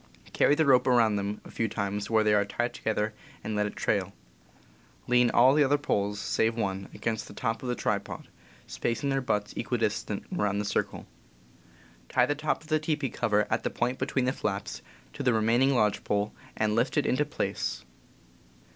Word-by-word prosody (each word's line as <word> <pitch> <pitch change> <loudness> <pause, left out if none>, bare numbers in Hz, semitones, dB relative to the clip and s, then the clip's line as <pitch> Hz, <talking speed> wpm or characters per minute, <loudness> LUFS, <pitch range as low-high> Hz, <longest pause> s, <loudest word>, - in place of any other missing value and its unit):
Carry 145 - +4
the 160 +1 +2
rope 130 -2 +5
around 115 -4 +4
them 100 +1 -3
a - - -11
few 115 - -1
times 100 -1 -3
where 110 -1 +3
they 105 0 +3
are 105 -1 +4
tied 120 +4 -2
together, 110 0 -1 0.3
and 110 +1 -3
let 105 0 +1
it - - -8
trail. 100 -2 0 0.9
Lean 125 0 +4
all 125 +3 +6
the 150 0 +5
other 145 +1 +3
poles, 105 -8 -1
save 110 +2 +1
one, 95 -3 -3
against 110 -2 -3
the 100 - -12
top 115 -1 -2
of 125 - -4
the 125 - 0
tripod, - - -3 0.4
spacing 130 +4 -2
their 135 0 +1
butts 105 -5 -1
equidistant - - -2
around 100 -1 0
the 105 - -1
circle. 105 - -2 1.0
Tie 125 - +4
the 145 - 0
top 155 +2 -2
of - - -16
the 155 0 +3
teepee 150 -4 -1
cover, 105 -1 +1
at 110 - +1
the - - -1
point 125 +2 -2
between 130 -1 0
the 130 - +1
flaps, 100 - -3 0.3
to - - -6
the 125 -3 +3
remaining 120 +5 +3
lodge 105 -4 +2
pole, 105 0 -1 0.2
and 110 0 +1
lift 115 +7 +1
it 145 - +2
into 130 +4 +2
place. 150 - -3
115 Hz, 190 wpm, -28 LUFS, 105-130 Hz, 1.0 s, all